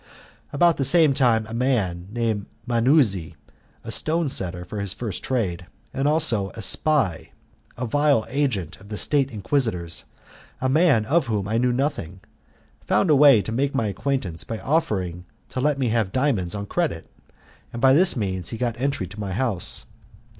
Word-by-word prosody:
About 170 Hz, +3 st, +3 dB
the 135 Hz, -, 0 dB
same 155 Hz, 0 st, +5 dB
time 120 Hz, -5 st, +2 dB
a 110 Hz, -, -9 dB
man 110 Hz, -9 st, -1 dB
named 110 Hz, -3 st, -2 dB, 0.2 s
Manuzzi, 115 Hz, -, +2 dB, 0.5 s
a -, -, -6 dB
stone 160 Hz, -1 st, -1 dB
setter 90 Hz, -8 st, -3 dB
for 105 Hz, +4 st, -6 dB
his 100 Hz, -2 st, -2 dB
first 110 Hz, -6 st, -5 dB
trade, 95 Hz, -9 st, -2 dB, 0.3 s
and 135 Hz, +1 st, 0 dB
also 145 Hz, -11 st, +1 dB
a 115 Hz, -, -6 dB
spy, 140 Hz, -, +1 dB, 0.4 s
a 125 Hz, -, -3 dB
vile 145 Hz, -2 st, +2 dB
agent 115 Hz, -, -2 dB
of 100 Hz, -, -15 dB
the 105 Hz, -, -5 dB
State 140 Hz, +2 st, +1 dB
Inquisitors 105 Hz, -, -1 dB, 0.5 s
a 130 Hz, -, 0 dB
man 135 Hz, -5 st, +3 dB
of 155 Hz, +3 st, +1 dB
whom 105 Hz, -4 st, -2 dB
I 110 Hz, +2 st, 0 dB
knew 125 Hz, 0 st, +2 dB
nothing 120 Hz, -, -3 dB, 0.6 s
found 180 Hz, -, +2 dB
a -, -, +6 dB
way 135 Hz, -7 st, +6 dB
to 110 Hz, -, -5 dB
make 135 Hz, +4 st, -1 dB
my 115 Hz, -, +1 dB
acquaintance 105 Hz, -5 st, -3 dB
by 115 Hz, -, -5 dB
offering 100 Hz, -, -1 dB, 0.2 s
to 130 Hz, -, -4 dB
let 145 Hz, +1 st, +1 dB
me 130 Hz, -3 st, 0 dB
have 110 Hz, -4 st, 0 dB
diamonds 115 Hz, -10 st, 0 dB
on 100 Hz, 0 st, -4 dB
credit, 150 Hz, -, -2 dB, 0.6 s
and 120 Hz, -, -6 dB
by 130 Hz, +1 st, +5 dB
this 180 Hz, +6 st, +6 dB
means 95 Hz, -5 st, -2 dB
he 115 Hz, -, -5 dB
got 120 Hz, 0 st, -1 dB
the 120 Hz, -, -12 dB
entry 140 Hz, -7 st, -1 dB
of 100 Hz, +4 st, -11 dB
my 100 Hz, -3 st, -4 dB
house. 110 Hz, -5 st, -1 dB
115 Hz, 175 wpm, -23 LUFS, 100-140 Hz, 0.6 s, a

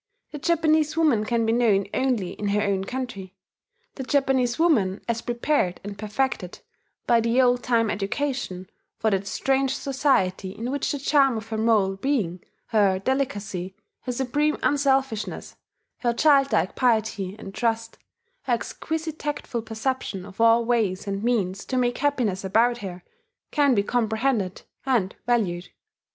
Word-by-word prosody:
The 295 Hz, -, -6 dB
Japanese 310 Hz, -1 st, +2 dB
woman 280 Hz, -10 st, +3 dB
can 230 Hz, 0 st, +1 dB
be 225 Hz, -, +2 dB
known 215 Hz, -5 st, +3 dB
only 250 Hz, -9 st, 0 dB
in 205 Hz, -, -4 dB
her 205 Hz, +1 st, +1 dB
own 195 Hz, -2 st, 0 dB
country, 200 Hz, -6 st, -6 dB, 0.6 s
the 265 Hz, -, -6 dB
Japanese 260 Hz, -3 st, +1 dB
woman 220 Hz, -, +2 dB
as 230 Hz, -1 st, -1 dB
prepared 240 Hz, -6 st, 0 dB
and 205 Hz, 0 st, -6 dB
perfected 215 Hz, -2 st, -2 dB, 0.5 s
by 235 Hz, -1 st, +4 dB
the 230 Hz, +3 st, +1 dB
old 245 Hz, -1 st, +4 dB
time 230 Hz, -3 st, +1 dB
education 200 Hz, -3 st, -3 dB, 0.3 s
for 220 Hz, -, +1 dB
that 195 Hz, 0 st, -1 dB
strange 270 Hz, +2 st, +1 dB
society 200 Hz, -9 st, 0 dB
in 235 Hz, +3 st, -3 dB
which 285 Hz, 0 st, -1 dB
the 290 Hz, -, -2 dB
charm 275 Hz, -3 st, +3 dB
of 220 Hz, 0 st, -7 dB
her 220 Hz, -, -2 dB
moral 210 Hz, -4 st, +2 dB
being, 195 Hz, -8 st, -1 dB, 0.3 s
her 200 Hz, -4 st, +3 dB
delicacy, 200 Hz, -6 st, -2 dB, 0.2 s
her 250 Hz, -, -4 dB
supreme 280 Hz, +5 st, 0 dB
unselfishness, 270 Hz, -6 st, 0 dB, 0.4 s
her 240 Hz, -2 st, +1 dB
child 275 Hz, +1 st, +4 dB
like -, -, +1 dB
piety 220 Hz, -6 st, +1 dB
and 195 Hz, -, -9 dB
trust, 225 Hz, 0 st, -2 dB, 0.5 s
her -, -, +1 dB
exquisite 320 Hz, -1 st, -3 dB
tactful 290 Hz, -5 st, -3 dB
perception 220 Hz, -3 st, -3 dB
of 200 Hz, +2 st, -7 dB
all 230 Hz, 0 st, +5 dB
ways 220 Hz, -6 st, 0 dB
and 200 Hz, 0 st, -3 dB
means 205 Hz, -5 st, 0 dB
to 260 Hz, -, -2 dB
make 245 Hz, -1 st, +1 dB
happiness 245 Hz, -9 st, 0 dB
about 230 Hz, +5 st, +2 dB
her, 180 Hz, -3 st, -7 dB, 0.5 s
can 285 Hz, -4 st, +3 dB
be 200 Hz, -, +2 dB
comprehended 220 Hz, -3 st, 0 dB, 0.2 s
and 235 Hz, -8 st, 0 dB
valued. 185 Hz, -8 st, 0 dB
230 Hz, 150 wpm, -25 LUFS, 200-265 Hz, 0.6 s, all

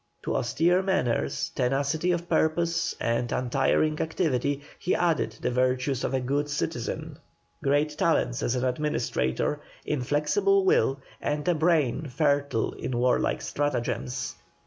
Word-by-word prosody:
To -, -, -2 dB
austere 165 Hz, +10 st, +2 dB
manners, 125 Hz, -, 0 dB
tenacity 140 Hz, +7 st, +1 dB
of 175 Hz, 0 st, -2 dB
purpose, 165 Hz, +1 st, +1 dB
and 115 Hz, +1 st, 0 dB
untiring 135 Hz, +4 st, +1 dB
activity 145 Hz, -4 st, 0 dB, 0.2 s
he 180 Hz, -, +1 dB
added 170 Hz, -4 st, +1 dB
the -, -, 0 dB
virtues 130 Hz, +1 st, +1 dB
of -, -, 0 dB
a -, -, +2 dB
good 140 Hz, +3 st, -1 dB
citizen, 145 Hz, -, -3 dB, 0.4 s
great 145 Hz, +2 st, +2 dB
talents -, -, +1 dB
as 120 Hz, -, 0 dB
an 125 Hz, 0 st, 0 dB
administrator, 145 Hz, -, -1 dB, 0.2 s
inflexible 150 Hz, -, +2 dB
will, 135 Hz, -, +3 dB, 0.2 s
and 150 Hz, +2 st, -2 dB
a 175 Hz, -, +4 dB
brain 155 Hz, -3 st, +1 dB
fertile 140 Hz, -3 st, +1 dB
in 125 Hz, -, -4 dB
warlike 125 Hz, +1 st, +1 dB
stratagems. 125 Hz, -3 st, -2 dB
145 Hz, 125 wpm, -27 LUFS, 125-160 Hz, 0.4 s, a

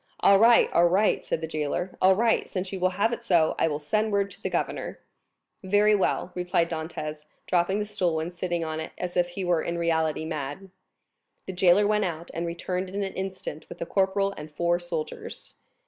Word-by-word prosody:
"All 200 Hz, -1 st, +6 dB
right, 230 Hz, +2 st, +6 dB
all 170 Hz, +1 st, +5 dB
right," 195 Hz, +5 st, +2 dB
said 160 Hz, -, -2 dB
the 160 Hz, -, -3 dB
jailer; 155 Hz, +4 st, -3 dB
"all 190 Hz, +1 st, +6 dB
right, 230 Hz, +2 st, +1 dB
since 185 Hz, -1 st, -4 dB
you 190 Hz, -, -3 dB
will 185 Hz, 0 st, +3 dB
have 225 Hz, +4 st, +2 dB
it 235 Hz, -, -5 dB
so. 170 Hz, -8 st, +3 dB
I -, -, +3 dB
will 150 Hz, -2 st, -1 dB
send 215 Hz, +9 st, 0 dB
word 200 Hz, -1 st, +1 dB
to -, -, -13 dB
the -, -, -2 dB
governor." -, -, -3 dB, 0.7 s
"Very 205 Hz, +2 st, +4 dB
well," 190 Hz, -2 st, 0 dB
returned 175 Hz, -1 st, 0 dB
Dantès, 155 Hz, -2 st, -5 dB, 0.2 s
dropping 180 Hz, +2 st, +1 dB
the 210 Hz, -, -1 dB
stool 180 Hz, -6 st, -1 dB
and 165 Hz, +3 st, -4 dB
sitting 175 Hz, -1 st, -2 dB
on 160 Hz, 0 st, -3 dB
it 160 Hz, -, -6 dB
as 180 Hz, -1 st, -4 dB
if 175 Hz, -1 st, +3 dB
he 180 Hz, +2 st, -5 dB
were 175 Hz, -2 st, +2 dB
in 170 Hz, -, -3 dB
reality 160 Hz, -2 st, 0 dB
mad. 155 Hz, +4 st, -5 dB, 0.7 s
The 190 Hz, -, -5 dB
jailer 185 Hz, +2 st, +4 dB
went 210 Hz, 0 st, +2 dB
out, 170 Hz, -1 st, -5 dB
and 170 Hz, +1 st, -3 dB
returned 180 Hz, +2 st, -3 dB
in 200 Hz, +2 st, -3 dB
an 195 Hz, -, -4 dB
instant 190 Hz, -4 st, -6 dB
with -, -, -10 dB
a -, -, -3 dB
corporal 195 Hz, +2 st, +1 dB
and 150 Hz, +1 st, -8 dB
four 170 Hz, +3 st, 0 dB
soldiers. 170 Hz, -3 st, -6 dB
180 Hz, 210 wpm, -26 LUFS, 165-195 Hz, 0.7 s, All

